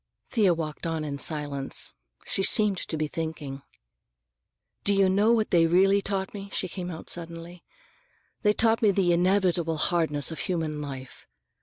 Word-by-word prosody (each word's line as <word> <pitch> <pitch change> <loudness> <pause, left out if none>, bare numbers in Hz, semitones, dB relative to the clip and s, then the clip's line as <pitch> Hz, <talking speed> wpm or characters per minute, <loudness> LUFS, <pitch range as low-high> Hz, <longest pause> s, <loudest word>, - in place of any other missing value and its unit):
Thea 200 -7 +3
walked 160 0 -5
on 160 -1 -2
in 140 -1 -5
silence. 145 -3 -3 0.3
She - - -1
seemed 200 -1 +4
to 160 - -4
be 155 - 0
thinking. 150 -4 -5 1.2
"Do 200 - +2
you 195 -1 +4
know 205 +4 +3
what 225 -2 +1
they 165 -2 +5
really 195 +4 +4
taught 195 -1 -3
me?" 200 -1 -7
she 185 - -2
came 180 0 -6
out 160 -2 -8
suddenly. 170 +1 -7 0.8
"They 210 -1 +3
taught 225 +1 +2
me 215 - +5
the 190 -3 +2
inevitable 175 -2 +1
hardness 155 -3 +1
of 160 - -6
human 160 -5 -2
life. 135 -3 -8
175 Hz, 160 wpm, -26 LUFS, 155-195 Hz, 1.2 s, they